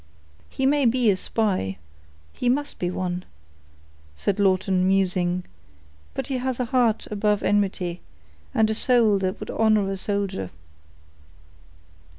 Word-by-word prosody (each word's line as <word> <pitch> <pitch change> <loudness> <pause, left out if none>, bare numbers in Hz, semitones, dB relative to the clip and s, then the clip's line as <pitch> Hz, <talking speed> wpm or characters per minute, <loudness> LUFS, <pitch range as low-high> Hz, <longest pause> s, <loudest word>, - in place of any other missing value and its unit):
"He 265 - -2
may 280 -1 +3
be 235 -2 +3
a - - +1
spy—he 85 - -3
must 285 +3 -1
be 175 - -1
one," 180 0 -3 0.9
said 200 - -1
Lawton, 185 -1 +2
musing; 185 -2 +1 0.7
"but - - -2
he 270 - -2
has 260 0 -2
a 250 - 0
heart 235 -2 +1
above 210 0 +1
enmity, 185 -4 0 0.5
and 220 - +3
a - - +1
soul 225 -3 +3
that 185 0 -2
would - - -6
honor 215 -3 +2
a 195 - -3
soldier." 195 - -2
200 Hz, 130 wpm, -24 LUFS, 180-225 Hz, 0.9 s, may